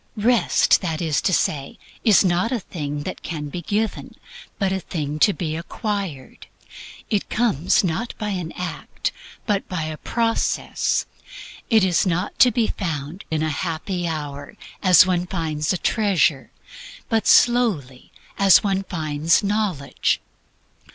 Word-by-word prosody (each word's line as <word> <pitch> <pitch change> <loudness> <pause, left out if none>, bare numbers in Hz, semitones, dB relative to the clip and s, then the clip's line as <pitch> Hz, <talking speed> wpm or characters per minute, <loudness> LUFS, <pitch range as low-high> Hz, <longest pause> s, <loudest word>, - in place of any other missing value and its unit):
Rest, 230 +2 +3
(that 165 -4 -2
is 155 -5 0
to - - +1
say), 140 -5 -1 0.3
is 210 -4 +5
not 180 +5 +1
a 250 - 0
thing 150 -6 -5
that - - -6
can 150 -3 -5
be 175 +4 -5
given, 210 +6 -2 0.4
but 195 -2 0
a 190 - 0
thing 150 -4 -4
to 205 - +5
be 160 -5 -3
acquired. 185 - -5 0.6
It 205 -2 0
comes 210 - +2
not 190 +7 -2
by 210 -2 -3
an 180 -5 -3
act, 180 -2 -4 0.3
but 205 -2 -1
by 180 -3 -2
a 155 0 -5
process. 230 +5 0 0.6
It 220 -4 +5
is 185 0 +2
not 175 0 -2
to 255 - +8
be 235 -1 +1
found 165 -3 -4
in 155 -1 -1
a 155 - 0
happy 175 +3 -3
hour, 145 -3 -6 0.2
as 185 -2 +7
one 180 -1 0
finds 160 -4 -2
a 185 - 0
treasure; 185 - +1 0.6
but 225 -2 0
slowly, 200 - +3 0.3
as 195 -2 +6
one 195 -2 0
finds 160 -2 0
knowledge. 200 -9 0
180 Hz, 145 wpm, -22 LUFS, 155-205 Hz, 0.6 s, to